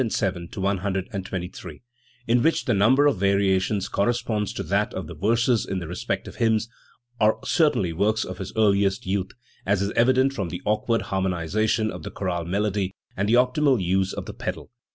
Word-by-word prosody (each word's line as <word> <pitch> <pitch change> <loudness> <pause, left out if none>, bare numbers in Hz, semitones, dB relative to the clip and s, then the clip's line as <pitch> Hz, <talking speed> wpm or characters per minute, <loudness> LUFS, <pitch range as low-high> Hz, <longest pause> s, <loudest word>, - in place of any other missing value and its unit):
107 95 -7 -2
123), 95 -2 -3 0.4
in 120 0 +3
which 160 +4 +2
the 125 - +2
number 120 +8 +4
of 145 -7 +3
variations 100 0 +2
corresponds 105 0 0
to - - -4
that 100 +2 0
of 95 - -4
the 85 - -8
verses 115 +6 +2
in 95 - -3
the 85 -3 -4
respective 90 +2 -4
hymns, 115 -1 +2 0.5
are 110 0 +4
certainly 145 - +2
works 105 +5 +1
of 95 0 -7
his 95 -1 -5
earliest 100 +1 +2
youth, 95 0 -1 0.3
as 100 0 +1
is 100 +1 -1
evident 130 +3 +3
from 95 -9 -3
the 90 - -6
awkward 110 +2 +1
har 95 0 -2
monisation 100 +5 0
of 90 - -8
the - - -6
chorale 90 -3 -3
melody 100 +1 -1 0.2
and 100 +2 -1
the 115 - +5
optional 130 +1 +3
use 95 +1 +1
of - - -5
the - - -7
pedal. - - -5
100 Hz, 175 wpm, -24 LUFS, 95-115 Hz, 0.5 s, the